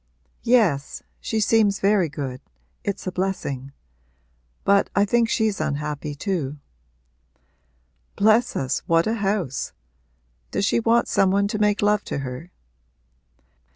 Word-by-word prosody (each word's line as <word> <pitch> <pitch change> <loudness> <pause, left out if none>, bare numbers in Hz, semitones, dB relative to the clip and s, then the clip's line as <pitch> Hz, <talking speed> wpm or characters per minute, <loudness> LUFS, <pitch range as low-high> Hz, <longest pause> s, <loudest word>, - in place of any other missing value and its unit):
'Yes 205 - +2 0.2
she 220 - -2
seems 210 -2 +3
very 195 -4 +3
good 135 -3 -5 0.4
it's 200 - -3
a 185 - -2
blessing. 160 -8 -3 0.9
But 200 0 +3
I 200 - +4
think 230 +2 +2
she's 220 -7 0
unhappy 150 0 -3
too.' 150 -4 -3 1.6
'Bless 220 +4 +3
us, 130 -1 -1
what 165 0 +3
a 220 - 0
house! 195 - -2 0.8
Does 200 - 0
she 235 - +2
want 230 +1 +2
some 195 - +3
one 200 +1 +2
to 215 - -2
make 210 -1 +2
love 210 0 +3
to - - -3
her?' 135 +5 -6
195 Hz, 125 wpm, -23 LUFS, 150-215 Hz, 1.6 s, I